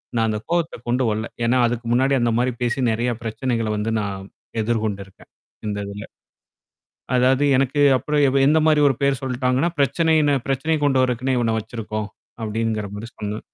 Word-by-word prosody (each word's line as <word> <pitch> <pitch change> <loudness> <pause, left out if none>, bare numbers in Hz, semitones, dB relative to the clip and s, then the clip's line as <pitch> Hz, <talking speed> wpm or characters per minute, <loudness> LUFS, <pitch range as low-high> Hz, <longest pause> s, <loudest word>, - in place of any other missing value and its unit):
நான் 115 -1 +2
அந்த 105 -1 -1
கோவத்த 170 -5 -1
கொண்டு 125 +2 +1
வரல. 110 +1 -2 0.2
ஏன்னா 120 +2 +3
அதுக்கு 120 0 -4
முன்னாடி 135 +3 +3
அந்த 120 0 +2
மாரி 125 +1 +1
பேசி 120 +2 -1
நெறைய 120 +2 0
பிரச்சனைகள 115 0 -2
வந்து 105 +2 -1
நான் 100 -2 -4 0.4
எதிர்கொண்டிருக்கேன் 105 -4 -3 0.4
இந்த 105 -1 -2
இதுல. 100 +1 -7 1.1
அதாவது 130 +2 +3
எனக்கு 135 +2 +1 0.2
அப்புறம் 150 +4 0
எவ் 135 - 0
எந்த 155 +2 +4
மாரி 155 -1 +4
ஒரு 135 - +1
பேர் 140 -2 +2
சொல்ட்டாங்கன்னா, 130 +4 0
பிரச்சனைனு 150 +1 +3
பிரச்சனைய 155 +4 0
கொண்டு 135 -2 +3
வரக்குன்னே 130 +1 -1
இவன 115 -2 +1
வச்சிருக்கோம். 110 -1 -5 0.3
அப்டிங்கிற 110 -1 -2
மாரி 110 +3 -7
சொன்னாங்க. 105 0 -4
120 Hz, 160 wpm, -22 LUFS, 110-135 Hz, 1.1 s, எந்த